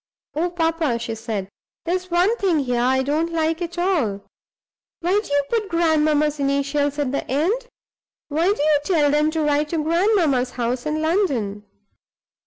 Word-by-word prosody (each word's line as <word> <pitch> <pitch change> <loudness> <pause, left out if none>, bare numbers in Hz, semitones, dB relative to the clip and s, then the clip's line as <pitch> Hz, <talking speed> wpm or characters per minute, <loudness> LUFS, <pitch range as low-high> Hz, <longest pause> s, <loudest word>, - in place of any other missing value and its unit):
"Oh, 330 +5 0
papa," 325 -6 0
she 230 -1 -4
said, 220 -4 -4 0.4
"there's 365 +2 -2
one 360 +6 +3
thing 375 -6 +1
here 250 -4 0
I 260 +2 +2
don't 310 +5 0
like 325 +1 0
at 345 0 -5
all! 300 - 0 0.8
Why 370 +5 +2
do - - -10
you 285 0 +3
put 440 -4 0
grandmamma's 305 -3 +2
initials 280 +1 0
at 285 -3 -1
the 280 - -1
end? 370 - 0 0.6
Why 325 +6 +1
do 405 - -1
you 300 -1 +4
tell 295 -4 +2
them 300 +1 +2
to 315 0 -1
write 295 0 +1
to 335 - -2
grandmamma's 330 - +2
house 245 +2 -2
in 310 +1 -1
London?" 260 - 0
305 Hz, 165 wpm, -22 LUFS, 275-345 Hz, 0.8 s, you